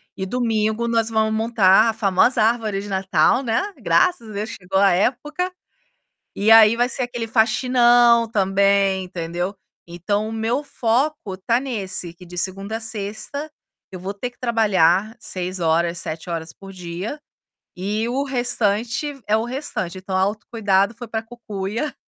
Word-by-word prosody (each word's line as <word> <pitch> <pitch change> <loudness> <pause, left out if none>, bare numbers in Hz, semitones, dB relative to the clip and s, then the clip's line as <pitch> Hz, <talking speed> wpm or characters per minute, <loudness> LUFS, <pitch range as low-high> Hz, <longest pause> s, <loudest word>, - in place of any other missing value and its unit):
E 190 - -4
domingo 225 0 0
nós 230 -1 +1
vamos 220 -1 +1
montar 220 -1 +4
a - - 0
famosa 215 +2 +2
árvore 220 -3 +1
de 205 - -8
Natal, 190 - +2
né, 225 -2 +1 0.2
graças 350 -12 +1
a - - -9
Deus 210 +2 -4
chegou 190 0 -2
a 200 -1 +5
época, 295 - 0 0.8
e 210 +2 +1
aí 225 0 +8
vai 245 +1 +2
ser 260 - -4
aquele 240 -2 -4
faxinão 240 +1 +4
também, 195 -1 +2
entendeu. 175 +2 -4 0.3
Então, 205 +5 -2
o - - -6
meu 225 +5 -1
foco 245 -5 -1
tá 230 +5 +1
nesse 195 -9 -4
que 180 +1 -14
de 180 0 -9
segunda 195 +4 -2
a - - -6
sexta, 225 +7 -4 0.4
eu 185 - -6
vou 195 +2 -5
ter 245 +5 -5
que 245 - -32
trabalhar 215 -3 +2
6 185 -1 -5
horas, 170 +1 +1
7 165 +2 -5
horas 160 -1 -4
por 195 +2 -12
dia, 180 - -6 0.6
e 210 +5 -2
o 260 +3 -1
restante 245 +2 -1
é 215 - +4
o 220 - -1
restante 240 - -4
então 185 0 -4
autocuidado 200 +1 0
foi 240 +1 -8
para 220 0 -3
cucuia, 225 +3 -5
215 Hz, 160 wpm, -21 LUFS, 190-235 Hz, 0.8 s, aí